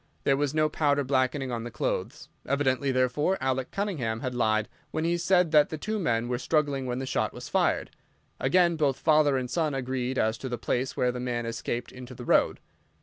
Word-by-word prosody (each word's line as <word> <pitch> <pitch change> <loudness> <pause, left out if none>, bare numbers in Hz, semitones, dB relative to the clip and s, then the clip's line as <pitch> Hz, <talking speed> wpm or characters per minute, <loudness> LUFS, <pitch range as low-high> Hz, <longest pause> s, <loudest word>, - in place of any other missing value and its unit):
There 135 - +3
was 145 +1 -1
no 155 0 +3
powder 145 -2 +1
blackening 130 0 0
on 115 -1 -3
the 120 - -5
clothes. 120 - -3 0.2
Evidently, 140 0 +1
therefore, 130 +8 +1
Alec 130 -1 -1
Cunningham 140 - -2
had 130 -1 -3
lied 110 -3 +1 0.2
when 155 - -2
he 170 +1 +1
said 180 -1 +2
that 150 -2 +5
the 155 - -4
two 215 +7 -3
men 120 - 0
were 125 0 -2
struggling 140 -2 0
when 125 0 -2
the 135 - -3
shot - - -1
was - - -8
fired. - - +1 0.5
Again, 175 -2 +3
both 140 -4 +1
father 150 -3 +3
and 130 -1 -2
son 155 +1 -1
agreed 130 0 -2
as 110 +1 +1
to 130 - -5
the 120 - -3
place 125 +3 -2
where 125 0 +2
the 125 - -6
man 120 -1 -2
escaped 115 +1 -4
into 125 0 -10
the 120 - -8
road. - - +3
130 Hz, 205 wpm, -27 LUFS, 125-150 Hz, 0.5 s, that